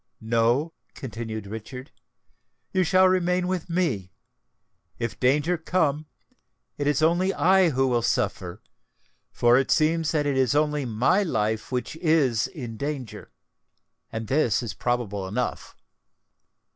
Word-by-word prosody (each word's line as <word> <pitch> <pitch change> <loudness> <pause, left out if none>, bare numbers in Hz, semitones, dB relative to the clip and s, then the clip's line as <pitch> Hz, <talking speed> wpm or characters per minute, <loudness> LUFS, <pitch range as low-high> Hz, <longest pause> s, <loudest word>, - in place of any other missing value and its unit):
No," 115 +8 +1 0.2
continued 115 -4 -6
Richard, 115 +6 -8 0.8
"you 185 -1 +3
shall 185 +2 +4
remain 180 -1 +1
with 185 -2 -3
me. 135 - -1 0.9
If 115 -1 -4
danger 150 +7 +2
come, 155 -3 0 0.7
it 145 - -2
is 145 +1 +1
only 175 +4 +3
I 185 +3 +4
who 135 -2 +1
will 120 -2 +1
suffer—for 115 +2 -2
it 135 - -1
seems 160 0 +2
that 150 -2 0
it 140 -2 0
is 130 +1 +2
only 150 -1 +1
my 125 - +2
life 110 - -1
which 125 +4 -3
is 150 -9 +2
in 120 -9 -8
danger. 140 -4 -5 0.8
And 110 0 -4
this 125 -2 +1
is 115 - -5
probable 105 -6 -2
enough." 120 +6 -4
135 Hz, 125 wpm, -25 LUFS, 115-160 Hz, 0.9 s, shall